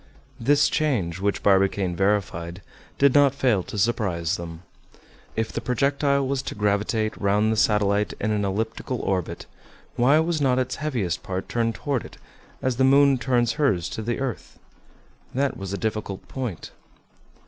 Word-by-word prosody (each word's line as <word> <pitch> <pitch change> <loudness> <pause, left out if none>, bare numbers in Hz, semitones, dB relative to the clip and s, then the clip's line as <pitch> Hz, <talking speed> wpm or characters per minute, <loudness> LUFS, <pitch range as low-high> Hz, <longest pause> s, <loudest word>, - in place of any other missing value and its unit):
This 145 +5 +4
change, 105 - 0
which 100 +1 -1
Barbicane 95 -2 +2
verified, 95 -2 -1 0.3
did 140 -2 +4
not 140 -2 +5
fail 125 -8 +2
to 105 - -8
surprise 100 -6 0
them. 85 0 -8 0.7
If 110 -1 -1
the - - -4
projectile 140 +1 +1
was 135 -1 -1
to 135 - -6
gravitate 105 +1 0
round 105 +2 +2
the - - +1
satellite 105 -1 +2
in 110 - 0
an 105 -1 0
elliptical 110 +5 -2
orbit, 95 -3 -2 0.5
why 130 +5 +5
was 160 -1 +1
not 130 -2 +3
its 130 0 -1
heaviest 120 - -2
part 95 0 -4
turned 115 -1 -1
toward 140 -5 -2
it, - - -12 0.5
as 130 -2 0
the 130 - +3
moon 135 0 +5
turns 120 -2 +1
hers 110 - +1
to - - -5
the 120 +3 -2
earth? 130 -9 -5 0.8
That 140 +1 +1
was 95 -1 -6
a 100 - -2
difficult 110 -3 -4
point. 125 -10 -5
110 Hz, 160 wpm, -24 LUFS, 100-130 Hz, 0.8 s, not